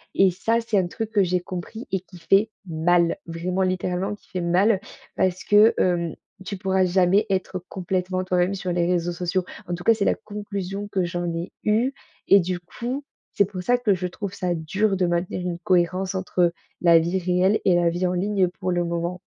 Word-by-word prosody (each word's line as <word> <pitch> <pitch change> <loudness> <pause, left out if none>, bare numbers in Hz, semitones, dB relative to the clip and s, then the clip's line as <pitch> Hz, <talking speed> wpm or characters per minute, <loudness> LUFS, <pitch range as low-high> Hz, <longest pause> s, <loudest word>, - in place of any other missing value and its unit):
et 195 -1 +5
ça, 225 +6 0
c'est 225 -2 0
un 180 - 0
truc 220 +4 -5
que 210 -2 +3
j'ai 180 0 +1
compris 185 +6 -7
et 190 - +1
qui 185 0 -15
fait 195 +6 +3 0.2
mal, 170 0 +2
vraiment, 175 +3 -2
littéralement, 185 +2 -1
qui - - -26
fait 185 - -3
mal 185 +4 +3 0.4
parce 185 -1 0
que, 210 +2 +6
hem, 170 -3 +1 0.3
tu 200 +1 -4
pourras 190 -1 +1
jamais 185 +2 +3
être 185 -1 -1
complètement 185 0 -2
toi-même 185 +1 +1
sur 185 -1 -3
les 175 -1 +1
réseaux 175 -1 0
sociaux. 180 +1 -1 0.2
En 175 - -2
tout 175 - -9
cas, 230 - +6
c'est 215 -2 -1
la - - +3
conclusion 205 -1 -5
que 190 -2 0
j'en 175 0 -2
ai 170 +2 -4
eu 230 +6 +2 0.3
et 200 - +7
du 180 0 -2
coup, 245 +10 -5 0.3
c'est 200 - +3
pour 190 -1 -6
ça 245 +6 +3
que 235 -5 +2
je 180 -1 -2
trouve 195 +2 -6
ça 180 -3 -1
dur 195 +6 0
de 185 - +2
maintenir 175 +1 -1
une 175 -1 -3
cohérence 185 0 +1
entre 180 -2 +1 0.3
la 170 -1 +6
vie 170 +3 0
réelle 180 +3 +2
et 180 - +5
la 175 -1 +3
vie 175 +2 -1
en 180 - -1
ligne, 190 +1 +1
pour 185 0 -4
le 175 0 +1
moment. 170 +1 -2
185 Hz, 210 wpm, -24 LUFS, 175-200 Hz, 0.4 s, et